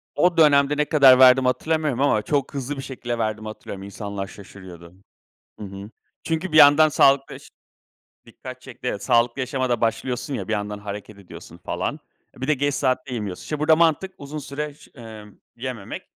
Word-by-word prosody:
O 175 Hz, +2 st, +2 dB
dönemde, 145 Hz, -2 st, +4 dB
ne 150 Hz, -, +2 dB
kadar 135 Hz, -5 st, +6 dB
verdiğimi 130 Hz, 0 st, +6 dB
hatırlamıyorum 150 Hz, +1 st, -1 dB
ama 110 Hz, -7 st, +2 dB
çok 140 Hz, +5 st, -2 dB
hızlı 140 Hz, +1 st, -4 dB
bir -, -, -5 dB
şekilde 120 Hz, -3 st, -5 dB
verdiğimi 110 Hz, -1 st, -3 dB
hatırlıyorum. 100 Hz, -2 st, -8 dB
İnsanlar 100 Hz, -1 st, -6 dB
şaşırıyordu 90 Hz, -4 st, -13 dB, 0.7 s
Hı 105 Hz, -, -7 dB
hı. 100 Hz, +2 st, -9 dB, 0.3 s
Çünkü 165 Hz, +1 st, -3 dB
bir -, -, +1 dB
yandan 150 Hz, +1 st, +7 dB
sağlıklı 135 Hz, -1 st, +3 dB
yaş -, -, -14 dB, 0.8 s
Dikkat -, -, -11 dB
çekti, -, -, -11 dB
evet. -, -, -4 dB
Sağlıklı 120 Hz, +2 st, +2 dB
yaşama 130 Hz, 0 st, -2 dB
da 120 Hz, -, 0 dB
başlıyorsun 125 Hz, +4 st, -2 dB
ya, -, -, -5 dB
bir -, -, -2 dB
yandan 105 Hz, 0 st, -3 dB
hareket 105 Hz, 0 st, -8 dB
ediyorsun 95 Hz, -, -13 dB
falan. -, -, -4 dB, 0.4 s
E, -, -, -15 dB
bir 130 Hz, -, -4 dB
de 155 Hz, -, +4 dB
geç 145 Hz, +1 st, -1 dB
saatte 130 Hz, -1 st, -1 dB
yemiyorsun. 105 Hz, -5 st, -5 dB
İşte, 150 Hz, -, -5 dB
burada 155 Hz, +1 st, +4 dB
mantık 170 Hz, +3 st, +1 dB
uzun 145 Hz, +2 st, -7 dB
süre 145 Hz, +1 st, -6 dB
ş -, -, -19 dB
ımm 110 Hz, -3 st, -12 dB, 0.2 s
yememek, 120 Hz, -5 st, -6 dB
130 Hz, 180 wpm, -22 LUFS, 105-145 Hz, 0.8 s, yandan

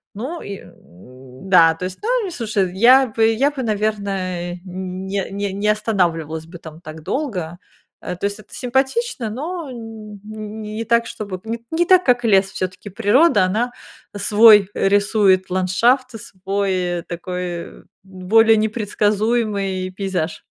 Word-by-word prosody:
ну, 270 Hz, +11 st, -5 dB
и, 200 Hz, -1 st, -6 dB
м, 125 Hz, -, -15 dB
да, 165 Hz, -3 st, +6 dB
то 180 Hz, +3 st, -6 dB
есть 185 Hz, -, -6 dB
ну, -, -, -3 dB
они, 395 Hz, -, -4 dB
слушай 210 Hz, -, -1 dB
я 255 Hz, +5 st, +6 dB
бы 225 Hz, 0 st, -1 dB
я 275 Hz, +6 st, +2 dB
бы, 275 Hz, -3 st, -5 dB
наверное, 195 Hz, -5 st, -2 dB
не 190 Hz, +1 st, -4 dB
не 200 Hz, 0 st, -3 dB
не 200 Hz, +2 st, -2 dB
останавливалась 170 Hz, -7 st, -1 dB
бы 170 Hz, +2 st, -11 dB
там 160 Hz, 0 st, -12 dB
так 155 Hz, -1 st, -10 dB
долго, 180 Hz, -, -3 dB, 0.4 s
э, 180 Hz, -, -5 dB
то 180 Hz, -, -4 dB
есть 205 Hz, +1 st, -2 dB
это 215 Hz, -, -16 dB
симпатично, 265 Hz, -, -1 dB
но 315 Hz, +6 st, -5 dB
н 220 Hz, -3 st, -9 dB
н-н 215 Hz, 0 st, -8 dB
не 215 Hz, +1 st, -5 dB
так, 235 Hz, +1 st, +2 dB
чтобы, 195 Hz, -4 st, -6 dB
нет, 230 Hz, +1 st, -4 dB
не 340 Hz, +2 st, +1 dB
так, 370 Hz, 0 st, +5 dB
как 245 Hz, -1 st, +3 dB
лес, 195 Hz, -3 st, +3 dB
всё-таки 185 Hz, +3 st, -5 dB
природа- 215 Hz, -, +3 dB
она 225 Hz, +7 st, -1 dB, 0.4 s
свой 205 Hz, -1 st, +6 dB
рисует 195 Hz, -1 st, +2 dB
ландшафт, 230 Hz, +8 st, +2 dB
свой 185 Hz, -2 st, -2 dB
такой 175 Hz, 0 st, -6 dB, 0.2 s
более 205 Hz, +4 st, +3 dB
непредсказуемый 210 Hz, -2 st, 0 dB
пейзаж. 185 Hz, -4 st, -3 dB
205 Hz, 145 wpm, -20 LUFS, 185-225 Hz, 0.4 s, да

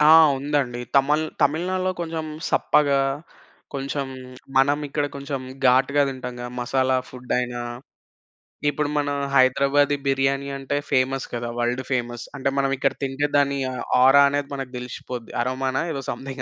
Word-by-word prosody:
ఆ! 150 Hz, -, +5 dB, 0.3 s
ఉందండి. 135 Hz, -4 st, -1 dB, 0.2 s
తమళ్ 150 Hz, +3 st, +3 dB, 0.2 s
తమిళనాడులో 185 Hz, +4 st, +1 dB
కొంచెం 160 Hz, -2 st, -3 dB, 0.2 s
సప్పగా, 140 Hz, -2 st, +3 dB, 0.7 s
కొంచెం 140 Hz, 0 st, -2 dB, 0.5 s
మనం 140 Hz, +2 st, +4 dB
ఇక్కడ 145 Hz, +1 st, -1 dB
కొంచెం 140 Hz, -1 st, -4 dB, 0.2 s
ఘాటుగా 130 Hz, +3 st, +4 dB
తింటాం 130 Hz, -2 st, -5 dB
గదా! 120 Hz, 0 st, -5 dB
మసాలా 130 Hz, +1 st, +1 dB
ఫుడైనా, 125 Hz, -1 st, -3 dB, 1.1 s
ఇప్పుడు 145 Hz, 0 st, -1 dB
మన 145 Hz, -1 st, 0 dB, 0.3 s
హైదరాబాదీ 140 Hz, +2 st, +4 dB
బిర్యానీ 135 Hz, +1 st, +1 dB
అంటే 135 Hz, +1 st, -2 dB
ఫేమస్ 135 Hz, +1 st, +1 dB
కదా! 120 Hz, 0 st, -3 dB
World 120 Hz, +2 st, 0 dB
famous. 120 Hz, -2 st, -2 dB
అంటే 135 Hz, 0 st, 0 dB
మనం 135 Hz, 0 st, +2 dB
ఇక్కడ -, -, +1 dB
తింటే 135 Hz, +2 st, 0 dB
దాని 140 Hz, 0 st, +2 dB, 0.2 s
ఆహ్, 125 Hz, -, -4 dB, 0.2 s
ఆరా 140 Hz, +2 st, +7 dB
అనేది 145 Hz, 0 st, -2 dB
మనకు 135 Hz, -2 st, -5 dB
దెలిసిపోద్ది. 125 Hz, -1 st, -7 dB
అరోమా‌నా 130 Hz, +2 st, -1 dB
ఏదో 140 Hz, -3 st, -3 dB
సమ్‌థింగ్ 135 Hz, 0 st, -5 dB
135 Hz, 135 wpm, -23 LUFS, 130-145 Hz, 1.1 s, ఆరా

